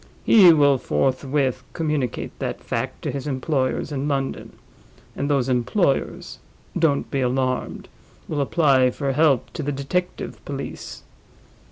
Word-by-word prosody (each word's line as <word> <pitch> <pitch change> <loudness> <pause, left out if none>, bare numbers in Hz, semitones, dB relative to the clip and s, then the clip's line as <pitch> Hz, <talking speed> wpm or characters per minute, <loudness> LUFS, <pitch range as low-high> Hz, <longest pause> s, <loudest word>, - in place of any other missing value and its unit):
He 190 -6 +8
will 145 -4 +4
forthwith 130 0 0
communicate 150 -7 -2
that - - -3
fact - - -4
to - - -2
his 140 0 -5
employers 135 0 -1
in 140 0 -2
London; 135 -2 -3 0.6
and 140 - -2
those 135 -3 +2
employers 135 - 0 0.4
(don't 150 -4 +1
be 135 - 0
alarmed!) 130 0 -1 0.4
will 145 -2 -1
apply 135 -3 +3
for 135 +2 -2
help 140 -2 +2
to 165 - -4
the 145 0 -2
detective 145 +7 -3
police. - - -7
140 Hz, 130 wpm, -23 LUFS, 130-150 Hz, 0.6 s, He